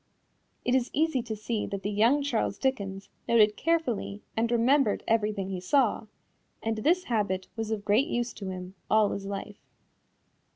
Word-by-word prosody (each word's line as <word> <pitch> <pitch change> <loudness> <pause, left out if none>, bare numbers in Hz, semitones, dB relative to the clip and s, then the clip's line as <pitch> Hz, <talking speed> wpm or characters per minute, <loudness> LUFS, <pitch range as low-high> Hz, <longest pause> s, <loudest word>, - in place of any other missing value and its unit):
It 245 - +2
is 260 -2 +2
easy 310 -4 +2
to 230 -2 -5
see 215 +1 -3
that 200 -1 -5
the 205 - -1
young 235 +8 +3
Charles 255 -6 -1
Dickens 200 -7 -2 0.2
noted 215 -2 +5
carefully 255 -11 -1
and 230 +1 +1
remembered 240 0 +3
everything 210 -3 +1
he 185 -2 -4
saw, 225 +1 +2 0.6
and 225 0 -1
this 345 +10 +2
habit 200 -5 -1
was 225 -1 -3
of 215 -2 -3
great 220 +8 +3
use 240 -6 -2
to 195 -2 -6
him 185 0 -6 0.2
all 215 -1 +4
his 195 0 -4
life. 200 +1 -6
220 Hz, 165 wpm, -28 LUFS, 200-250 Hz, 0.6 s, noted